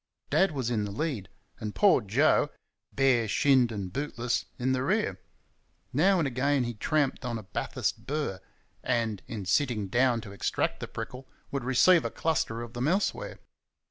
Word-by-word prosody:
Dad 195 - +4
was 130 -6 -2
in 110 -3 0
the - - -4
lead, 120 - -3 0.3
and 105 -1 -5
poor 195 -10 +5
Joe, 135 +8 +3 0.4
bare 130 -4 +3
shinned 130 +1 +3
and 100 -4 -5
bootless, 125 -4 -2
in 130 +1 0
the 130 -1 +1
rear. 130 - 0 0.7
Now 185 +8 +4
and 160 -5 +1
again 135 +1 +1
he 120 0 -3
tramped 140 +5 0
on 120 -2 -2
a 110 - -8
Bathurst 95 - -3
burr, 145 -10 -2 0.4
and, 115 -5 -1
in 105 -4 -5
sitting 105 0 +1
down 120 +1 +3
to 100 - -10
extract 100 - -1
the - - -5
prickle, 125 +4 -7 0.2
would 140 -2 -2
receive 145 +8 +5
a - - -1
cluster 120 -8 -1
of 120 0 -10
them 120 +3 -1
elsewhere. 190 +6 -1
125 Hz, 170 wpm, -28 LUFS, 115-145 Hz, 0.7 s, poor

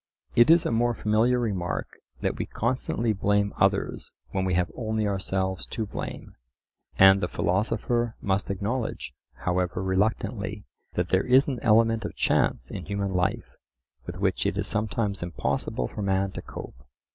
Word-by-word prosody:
It 120 +5 +6
is 165 0 +6
a - - 0
more 120 +1 +2
familiar 110 +4 +2
remark 100 -7 -2 0.2
that - - 0
we - - -3
constantly 120 -1 0
blame 100 0 +1
others - - +1 0.2
when 95 -1 -1
we 90 -1 +1
have 90 -2 +1
only 110 -2 -1
ourselves 95 -2 -1
to 110 - -3
blame; 100 - -6 0.6
and 95 0 +7
the 90 - 0
philosopher 115 +6 0
must 95 0 -1
acknowledge, 110 +5 -3 0.3
however 90 +1 0
reluctantly, 100 +1 -1 0.3
that 90 0 -1
there 95 +5 +2
is 130 +2 +5
an 130 -4 -2
element 115 0 +4
of 105 - -5
chance 60 - +1
in 95 - -6
human 100 -1 -2
life 90 -1 -1 0.6
with - - -5
which - - 0
it - - -1
is - - 0
sometimes 105 -1 -1
impossible 85 -7 -2
for - - -7
man 95 -1 +1
to - - -6
cope. 65 +2 -10
100 Hz, 155 wpm, -26 LUFS, 95-115 Hz, 0.6 s, and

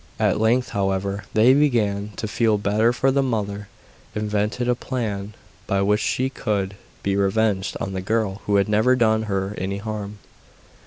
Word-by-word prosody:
At - - +1
length, 120 +3 +2
however, 100 0 -1
they 115 +4 +6
began 105 -8 +1
to 110 - -4
feel 110 0 +2
better, 105 +3 +2
for 135 +2 +1
the 140 +1 +2
mother 105 -5 -2 0.5
invented 105 +3 -1
a 125 - +4
plan 105 -5 -4 0.3
by 100 0 +1
which 105 +1 +2
she 130 +5 0
could 100 -7 -2 0.3
be 100 0 0
revenged 100 0 +1
on 95 - -3
the 95 - -3
girl 100 -1 -1
who 100 - +2
had 100 +1 +3
never 110 +4 +3
done 110 -3 +3
her 95 0 -1
any 95 +2 -2
harm. 105 -1 -5
105 Hz, 165 wpm, -23 LUFS, 100-115 Hz, 0.5 s, they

